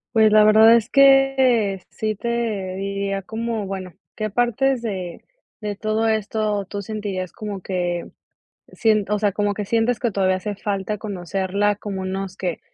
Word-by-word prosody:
Pues, 220 -1 +6
la 215 0 +7
verdad 220 +2 +7
es 230 0 +1
que 270 -7 +4
sí 215 -1 -3
te 220 -4 -2
diría 195 0 -3
como, 225 +1 -3
bueno, 190 -2 -6 0.2
¿qué 215 -1 -2
partes 245 +4 +1
de 185 -6 -5 0.4
de 210 -1 -3
todo 215 +2 0
esto 215 -1 -1
tú 200 +2 -5
sentirías 200 -3 -4
como 205 -3 -6
que, 175 -2 -3 0.6
sien 215 -2 +2
o 210 - +1
sea, 205 -1 +1
como 205 +1 0
que 205 +1 -4
sientes 230 +2 +1
que 235 0 0
todavía 185 -1 +2
hace 205 +2 -4
falta 200 0 -3
conocerla 200 0 -1
como 200 -2 -5
unos 190 0 -4
que, 180 -3 -3
210 Hz, 160 wpm, -22 LUFS, 195-220 Hz, 0.6 s, la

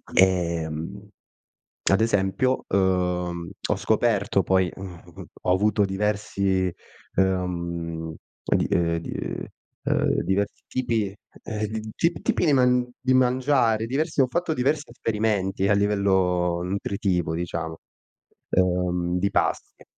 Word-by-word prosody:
Ehm, 85 +1 +1 0.8
ad 95 +1 +4
esempio, 115 +4 +1
uhm, 90 -2 0 0.2
ho - - +3
scoperto 105 -3 +2
poi, 95 -2 +2
uhm, 90 -3 -10 0.2
ho - - +2
avuto 105 +1 +3
diversi, 95 -2 0 0.4
ehm, 85 -3 -1 0.3
di - - +1
uhm, 85 -1 +2
di, - - -7
uhm, - - -4 0.4
uhm, - - +1
diversi 100 +2 -1
tipi, 115 -6 -1 0.3
eh, 110 -1 -3 0.3
t 170 -1 0
tipi - - +1
di 150 - +4
man 125 -1 +3
di 130 0 +1
mangiare, 125 -3 +3
diversi 150 +5 -1
ho 130 - +4
fatto 175 +4 -1
diversi 145 +4 0
esperimenti 105 -4 0
a - - +5
livello 95 -4 +2
nutritivo, 90 -3 -1
diciamo, 80 -1 -4 0.7
ehm, 90 -1 +1
di 100 +2 +1
pasti. - - -1
95 Hz, 115 wpm, -25 LUFS, 90-110 Hz, 0.8 s, a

